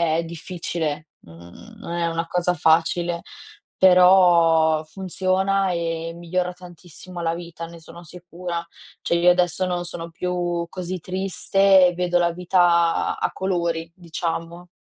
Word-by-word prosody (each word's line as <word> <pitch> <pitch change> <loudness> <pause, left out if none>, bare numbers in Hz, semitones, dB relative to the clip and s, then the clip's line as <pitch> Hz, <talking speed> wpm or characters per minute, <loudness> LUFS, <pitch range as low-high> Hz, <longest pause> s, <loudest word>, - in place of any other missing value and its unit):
è 165 - 0
difficile. 165 -2 -5
Mhmm, 85 - -15
non 170 - -8
è 170 -1 -1
una 165 0 -2
cosa 180 +1 0
facile, 170 +1 +1 0.5
però 175 -4 +5
funziona, 190 +2 -1
e 165 -1 -3
migliora 180 +1 -2
tantissimo 180 0 -11
la 165 -1 0
vita. 170 -1 -8
Ne 170 0 -12
sono 170 +2 -12
sicura. 175 0 -6 0.4
Cioè, - - 0
io 175 +1 +5
adesso 180 0 +1
non 180 -1 -2
sono 170 -1 -5
più 175 0 -2
così 180 0 -5
triste 190 +1 +3
e 175 - -1
vedo 175 0 0
la 170 -1 +2
vita 175 -1 +2
a - - -1
colori, 170 -3 -2
diciamo. 170 0 -5
175 Hz, 135 wpm, -22 LUFS, 165-180 Hz, 0.5 s, però